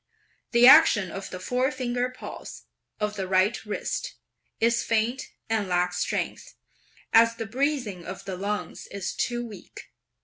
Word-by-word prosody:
The 235 0 +6
action 250 - +7
of 195 0 -6
the 185 - -7
forefinger 250 +3 -1
pulse, 255 - -9 0.4
of 210 -1 -1
the 190 -1 -3
right 190 +4 +2
wrist, 210 - -3 0.4
is 235 +1 +3
faint 230 +3 0 0.2
and 220 -3 0
lacks 180 0 0
strength, - - -3 0.6
as 230 0 +6
the 225 - -5
breathing 245 - -2
of 185 +3 -8
the 190 -1 -4
lungs 205 +3 -4
is 200 -2 -4
too 240 -1 -2
weak. 215 -4 -12
220 Hz, 140 wpm, -26 LUFS, 195-245 Hz, 0.6 s, action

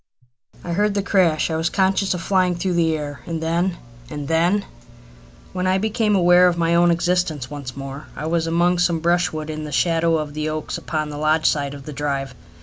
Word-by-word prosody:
I 175 - -5
heard 205 +3 +1
the 200 - 0
crash. 175 -5 +2
I - - -1
was 160 +1 0
conscious 190 0 +1
of 180 - -5
flying 185 -2 +2
through 180 +1 -1
the 165 -2 +2
air, 145 -3 -6
and 165 -1 -3
then 170 +2 0 0.3
and 145 0 -6
then! 175 +6 +2 0.9
When 185 0 -1
I 185 +1 +3
became 215 +1 +1
aware 180 0 +6
of 175 -1 +1
my 170 0 +1
own 175 0 +4
existence 170 -5 0
once 140 -3 -7
more 135 +1 -7
I 150 - -5
was 165 0 0
among 175 +2 +2
some 170 -2 +2
brushwood 160 -2 0
in 155 0 -5
the 150 - -6
shadow 165 +1 +2
of 150 -1 -4
the 155 +1 -2
oaks 155 0 -4
upon 155 -2 -3
the 145 0 -6
lodge 155 +1 +1
side 145 -1 +1
of 140 -1 -11
the 150 - -7
drive. 140 -2 -3
165 Hz, 210 wpm, -21 LUFS, 155-180 Hz, 0.9 s, aware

